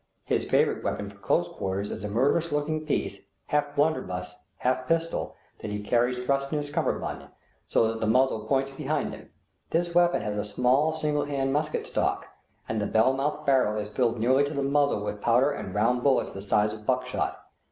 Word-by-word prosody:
His - - -1
favorite - - +2
weapon - - -2
for - - -18
close - - +1
quarters 95 +2 -3
is - - -6
a 105 - -3
murderous 140 +10 +2
looking 155 +1 -1
piece, - - -1 0.2
half 145 -1 0
blunderbuss, 145 - 0 0.2
half 130 0 0
pistol, 165 0 -1 0.2
that 105 - -5
he 105 0 -3
carries 120 +4 +1
thrust 135 +2 0
in 155 - 0
his 145 0 -3
kammerbund, - - -2 0.4
so 115 - +3
that 115 0 -3
the 110 - +1
muzzle 120 -2 +2
points 135 +1 +1
behind 145 +1 -2
him. - - -11 0.4
This 170 +1 0
weapon 175 -4 +3
has 105 -1 -3
a 105 - 0
small 125 +8 +2
single 150 -2 0
hand 135 -2 -1
musket 150 +1 -1
stock, - - -1 0.4
and 110 -1 -1
the 105 - 0
bell 110 +4 +3
mouthed 150 +3 -2
barrel 130 -6 +3
is 105 0 -4
filled 120 +1 0
nearly 130 +5 +4
to 145 +1 -5
the 140 - 0
muzzle 140 -6 +2
with 105 0 -4
powder 125 +5 +3
and 95 -9 -6
round 120 +4 +2
bullets 135 0 +2
the 95 - -7
size 105 +1 +2
of 105 -1 -10
buckshot. 125 0 -1
130 Hz, 195 wpm, -27 LUFS, 110-145 Hz, 0.4 s, nearly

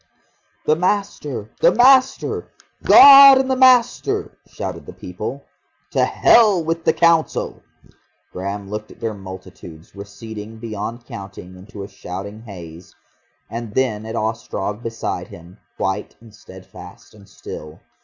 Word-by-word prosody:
"The 155 - +3
Master, 165 - -3
the - - +5
Master! 260 +4 +3 0.3
God 275 -1 +9
and 265 0 0
the - - +2
Master," 260 - +2
shouted - - -7
the - - -9
people. - - -7 0.5
"To - - +2
hell 210 -7 +4
with 165 +1 -3
the - - +4
Council!" 170 -2 +1 0.7
Graham 100 +2 -6
looked 105 +1 -6
at - - -16
their 115 -2 -3
multitudes, 95 -4 -12
receding 105 +2 -10
beyond 115 +1 -6
counting 95 -4 -10
into 100 +2 -11
a - - -8
shouting 100 +3 -8
haze, 90 -6 -12 0.5
and 115 -2 -7
then 110 -5 -1
at 110 - -6
Ostrog 110 -1 -4
beside 115 -1 -5
him, 85 +4 -15 0.2
white 95 +2 -3
and 115 -2 -17
steadfast 95 -3 -14
and 100 -2 -18
still. 75 -5 -10
110 Hz, 130 wpm, -19 LUFS, 100-165 Hz, 0.7 s, God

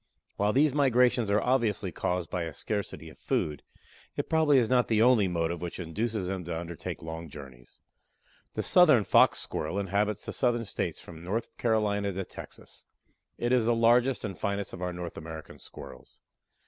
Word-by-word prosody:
While 105 +1 +1
these 140 +3 +3
migrations 125 -5 +3
are 100 +1 +3
obviously 110 -7 0
caused 90 +1 -2
by 85 -2 -1
a 80 - -6
scarcity 105 -2 -4
of - - -19
food, 75 -2 -1 0.5
it - - -4
probably 155 -3 +4
is 120 -3 +3
not 125 0 +3
the 110 -2 +2
only 115 -4 +5
motive 85 -1 -1
which 90 +1 -5
induces 105 +4 -2
them 95 -1 -3
to 85 -1 -3
undertake 85 -2 -6
long 80 0 -6
journeys. 65 -4 -12 0.7
The - - -1
southern 155 - +6
Fox - - +5
Squirrel 80 +5 -3
inhabits 100 +1 -1
the - - -4
Southern 120 -2 +1
States - - -3
from 85 -1 -11
North 105 +6 -3
Carolina 105 -3 +1
to 95 0 -4
Texas. - - -11 0.5
It 120 +1 -1
is 125 -3 +3
the 120 - +3
largest 120 +2 +3
and 100 -3 -5
finest 100 0 -3
of - - -8
our 90 0 -2
North 90 -1 -6
American 80 0 -9
Squirrels. 65 - -12
100 Hz, 175 wpm, -29 LUFS, 85-120 Hz, 0.7 s, southern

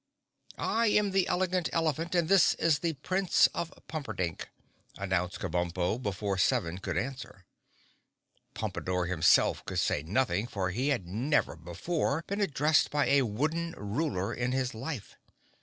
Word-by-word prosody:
"I 230 +1 +1
am 210 -1 +3
the 190 -1 +2
Elegant 185 -1 0
Elephant 165 +1 0
and 170 -2 +2
this 195 -1 +5
is 155 -4 +2
the 165 0 -1
Prince 185 +6 +2
of 170 - -3 0.2
Pumperdink," 110 - -4 0.5
announced 95 -2 -1
Kabumpo 90 +4 -1
before 100 -2 -2
Seven 85 0 +1
could - - -3
answer. 130 -8 -5 1.1
Pompadore, 90 -1 -2
himself, 85 -2 +3
could - - -5
say - - +1
nothing 100 - 0
for 95 -6 -2
he 125 +8 -1
had 140 -11 0
never 120 - 0
before 140 - -2
been 200 +1 -3
addressed 150 -4 +3
by 145 -1 +1
a 140 0 +5
wooden 155 +9 -1
Ruler 105 - -2
in 125 +1 -1
his 130 -1 -1
life. 125 0 -6
130 Hz, 140 wpm, -30 LUFS, -, 1.1 s, this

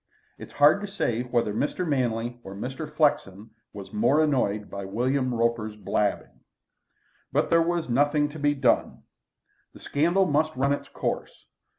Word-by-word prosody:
It - - -7
is - - -20
hard 150 +6 +5
to 205 - -4
say 120 - -1
whether 120 -4 -1
Mr. 150 - -2
Manley 120 -4 -1
or 95 - -9
Mr. 135 +8 -6
Flexen 110 - 0 0.2
was 100 -2 -10
more 130 +9 +3
annoyed 110 -9 0
by 100 0 -7
William 125 +6 -1
Roper's 115 -2 -1
blabbing. 100 0 -2 0.9
But - - 0
there 165 0 +5
was 170 0 -1
nothing 145 +4 +2
to 155 +1 -9
be 145 0 +2
done. 135 -3 +1 0.7
The - - -12
scandal 170 +6 +1
must 155 0 +1
run 140 +2 +1
its 145 - -5
course. - - -4
130 Hz, 160 wpm, -26 LUFS, 115-150 Hz, 0.9 s, hard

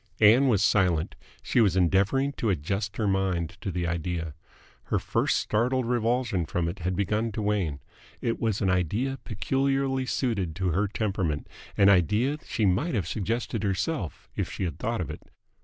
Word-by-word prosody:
Ann 115 +6 +6
was 105 -5 +3
silent. 90 -7 +2 0.3
She 120 - +2
was 100 -4 +3
endeavouring 100 - +2
to 115 - 0
adjust 95 +5 -2
her 110 - 0
mind 95 -4 0
to 105 - -3
the 90 -1 -2
idea. 85 -1 -2 0.5
Her - - 0
first - - +1
startled 125 +4 +1
revulsion 120 -6 0
from 85 +1 -1
it 90 +4 -5
had 90 +1 -1
begun 105 +4 0
to 110 - -3
wane. 95 -9 -1 0.4
It 115 - -1
was 110 -3 0
an 95 -2 +2
idea 105 - 0
peculiarly 135 +4 0
suited 100 - -1
to 95 0 0
her 95 +5 +1
temperament, 95 -7 -2 0.3
an 100 - +6
idea 105 - +3
that - - -22
she 110 - 0
might 100 - +1
have 95 -6 -1
suggested 110 +5 -2
herself 100 - -2
if - - -2
she - - -4
had 85 - -3
thought - - -1
of - - -4
it. - - -8
100 Hz, 175 wpm, -27 LUFS, 90-115 Hz, 0.5 s, Ann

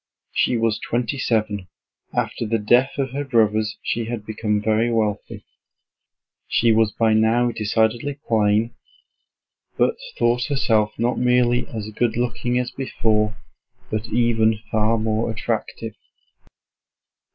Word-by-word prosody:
She 125 - +1
was 115 -1 +1
twenty 120 +3 -2
seven. 105 -6 -1 0.4
After 115 - -2
the 115 +1 +1
death 120 +5 +2
of 135 -2 -1
her 140 +2 -3
brothers 110 -5 +1
she 115 0 -1
had 115 -2 -5
become 105 -1 -1
very 110 +2 +1
wealthy. 105 -3 -2 1.0
She 115 0 +3
was 110 -1 +3
by 110 0 +2
now 115 +3 +3
decidedly 115 +5 0
plain, 110 +1 +2 1.0
but - - +2 0.2
thought 120 +1 +2
herself 115 -7 +1
not 120 +2 0
merely 125 0 +2
as 110 -2 -6
good 115 +1 0
looking 120 0 -1
as 125 0 -1
before 110 -5 0 0.5
but 110 +1 -2
even 115 -1 +2
far 110 +1 +2
more 110 +1 0
attractive. 110 0 -3
115 Hz, 125 wpm, -22 LUFS, 110-120 Hz, 1.0 s, She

